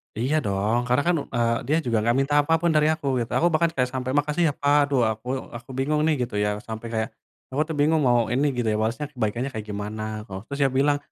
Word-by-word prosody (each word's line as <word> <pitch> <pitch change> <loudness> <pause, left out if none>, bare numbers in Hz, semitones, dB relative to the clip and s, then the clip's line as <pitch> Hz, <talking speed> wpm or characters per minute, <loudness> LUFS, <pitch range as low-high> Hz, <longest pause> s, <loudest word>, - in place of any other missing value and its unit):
Iya 130 +8 0
dong, 100 +4 +1
karena 125 +3 +3
kan, 175 - +4 0.2
eee, 115 -1 +2
dia 155 +3 +3
juga 115 -2 +1
nggak 115 +2 +1
minta 135 +2 0
apa 155 +3 0
pun 170 -1 +2
dari 150 0 +4
aku 155 -3 -5
gitu, 115 - -3
aku 170 - +3
bahkan 170 +2 +3
kayak 125 -1 +1
sampai, 130 0 -2
"Makasih 150 +4 +1
ya 145 - 0
Pak," 145 +1 +4
aduh 135 -4 +2
aku 110 +3 -8 0.3
aku 120 +2 -16
bingung 150 +3 +1
nih 160 - +3
gitu 120 -3 -6
ya, 105 - +1
sampai 110 +1 -6
kayak 110 0 -1 0.4
aku 135 +3 0
tuh 160 - -4
bingung 155 +2 +3
mau 120 -1 +4
ini, 135 +4 +2
gitu 120 -2 -1
ya, 105 - 0
balasnya 115 +7 -1
kebaikannya 120 0 -2
kayak 110 -3 -5
gimana 105 +1 -4 0.2
koh 95 0 -6
Terus 140 - -5
dia 135 - +2
bilang, 145 +1 +3
125 Hz, 245 wpm, -24 LUFS, 110-145 Hz, 0.4 s, kan